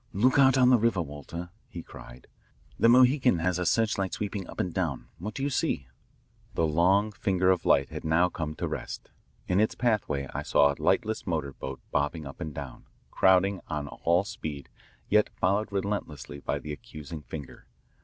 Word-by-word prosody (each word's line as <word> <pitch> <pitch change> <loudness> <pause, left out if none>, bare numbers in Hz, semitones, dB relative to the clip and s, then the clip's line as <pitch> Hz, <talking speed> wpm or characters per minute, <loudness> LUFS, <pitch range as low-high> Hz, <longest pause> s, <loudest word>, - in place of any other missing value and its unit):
"Look 125 +8 +3
out 135 -1 +6
on 125 -1 +6
the 125 - +6
river, 110 -6 +2
Walter," 80 +4 -8 0.2
he 85 - -7
cried. - - -12 0.5
"The 115 - +5
Mohican 125 -2 +5
has 90 +1 0
her 90 - -1
searchlight 100 -2 +1
sweeping 100 -2 -4
up - - -9
and 90 - -1
down. 85 -8 -2
What 105 +5 -6
do 135 - -3
you 140 - 0
see?" 65 - -1 0.7
The 80 - +2
long 95 +7 +3
finger 95 -2 +2
of 90 -3 0
light 70 -1 +4
had - - -7
now 80 +3 +3
come 80 -3 -4
to - - -3
rest. - - -6 0.4
In 90 +1 +2
its 110 - +2
pathway 100 - 0
I - - -2
saw 70 0 +4
a - - -12
lightless 110 -2 +1
motor 75 -6 -2
boat 65 0 -7
bobbing 75 +2 -1
up 70 -1 -10
and 80 - -4
down, 70 -3 -8 0.3
crowding 95 +1 +3
on 75 -2 -3
all 85 +5 +1
speed, 75 -8 -6 0.4
yet 105 0 +3
followed 100 +3 +1
relentlessly 95 -8 -3
by - - -2
the 75 - -6
accusing 75 +1 -9
finger. 75 -2 -9
90 Hz, 185 wpm, -28 LUFS, 75-105 Hz, 0.7 s, out